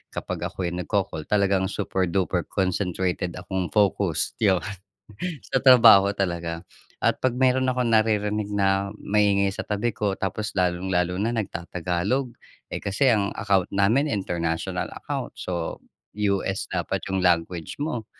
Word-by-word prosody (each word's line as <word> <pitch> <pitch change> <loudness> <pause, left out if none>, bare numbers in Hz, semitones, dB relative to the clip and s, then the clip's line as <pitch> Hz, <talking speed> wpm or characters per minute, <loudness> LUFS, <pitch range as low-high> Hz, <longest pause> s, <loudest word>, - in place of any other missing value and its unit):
kapag - - -4
ako'y 90 -2 -4
nagko-call, 90 -3 -2
talagang 100 -2 +2
super-duper 95 -2 -1
concentrated 90 -1 -1
akong 95 0 -3
focus, 100 -5 +2
yun. 95 -4 +3 0.9
Sa 135 - +1
trabaho 115 -6 +8
talaga. 85 -4 -3 0.4
At - - +2
'pag 130 -2 0
meron 130 +1 +2
akong 125 -2 0
naririnig 105 -2 +1
na 100 0 +1
maingay 100 -1 +2
sa 95 - -5
tabi 105 +3 -1
ko 105 -3 -1
tapos 100 +3 -3
lalong-lalo 90 -1 0
na 110 +4 0
nagtatagalog, 90 +4 -2 0.4
eh - - -3
kasi 105 +7 +1
ang 100 -3 +1
account 100 -4 +1
namin 105 +9 +3
international 85 - -2
account - - -5
so 85 -2 -4 0.3
US 100 -2 -1
dapat - - -2
yung 95 -1 0
language 85 - 0
mo, 125 -8 -2
100 Hz, 130 wpm, -25 LUFS, 90-105 Hz, 0.9 s, trabaho